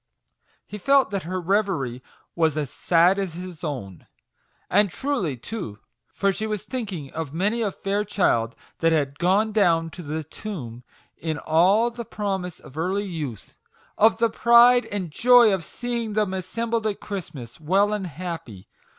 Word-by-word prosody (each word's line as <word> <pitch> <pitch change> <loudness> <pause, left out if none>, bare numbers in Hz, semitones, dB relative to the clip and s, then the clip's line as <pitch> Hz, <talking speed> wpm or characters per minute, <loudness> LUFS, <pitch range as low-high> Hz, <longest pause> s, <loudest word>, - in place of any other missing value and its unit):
He 210 - -8
felt 275 +4 +3
that 200 -1 -1
her 185 0 -2
reverie 175 - 0 0.3
was 160 -3 +1
as 145 -4 -2
sad 175 +3 +3
as 185 -4 -3
his 180 -3 -8
own; 110 - -6 0.6
and 205 -1 +3
truly 200 - -2
too, 125 - -6 0.3
for 200 -1 +1
she 215 +4 -3
was 210 -3 -3
thinking 195 - -5
of 160 -2 -5
many 210 +7 0
a 215 - +1
fair 200 +1 -2
child 115 - +1 0.2
that 165 0 +3
had 145 -3 0
gone 195 +5 +2
down 170 -6 +2
to 180 - -9
the 155 0 -4
tomb 145 - -7 0.3
in 160 -2 -3
all 190 +11 +3
the 235 0 -6
promise 195 -5 -4
of 140 +4 -11
early 190 +5 0
youth! 150 - -6 0.4
of 220 +1 +4
the 230 -1 +2
pride 240 +2 +6
and 190 -5 -4
joy 240 +3 +6
of 190 -3 -1
seeing 235 +3 -4
them 210 -3 0
assembled 225 +4 -2
at 205 - -3
Christmas, 135 - -7
well 195 +7 +2
and 200 -3 -2
happy 165 - -7
185 Hz, 160 wpm, -24 LUFS, 160-215 Hz, 0.6 s, pride